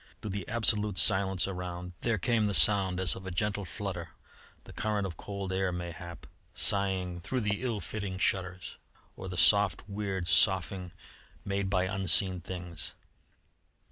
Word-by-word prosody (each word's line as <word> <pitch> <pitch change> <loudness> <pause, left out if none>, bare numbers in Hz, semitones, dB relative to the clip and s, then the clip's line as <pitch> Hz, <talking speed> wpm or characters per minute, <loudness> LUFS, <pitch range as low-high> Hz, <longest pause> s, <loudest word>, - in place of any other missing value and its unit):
Through 105 - -5
the 100 -2 -4
absolute 105 -3 +1
silence 95 -1 +3
around 90 -1 -6
there 115 -2 +1
came 110 +1 +1
the 100 - +2
sound 95 -3 +5
as 90 -3 0
of 95 - -9
a - - -2
gentle 100 +2 -1
flutter, 85 - -5 0.5
the - - -13
current 105 -2 -1
of 90 -4 -5
cold 100 +1 -5
air, 95 -1 0
mayhap, 85 -1 -7 0.3
sighing 95 -3 +1
through 130 +8 -2
the 105 0 -1
ill 120 -5 -2
fitting 100 +1 -4
shutters, 95 -1 -1 0.4
or 95 - -7
the 90 - -5
soft, 100 -4 +4
weird 100 -3 -3
soughing 90 0 +2 0.5
made 100 -1 -1
by 95 -2 +2
unseen 95 -1 +2
things. 90 -2 -7
95 Hz, 150 wpm, -30 LUFS, 90-100 Hz, 0.5 s, sound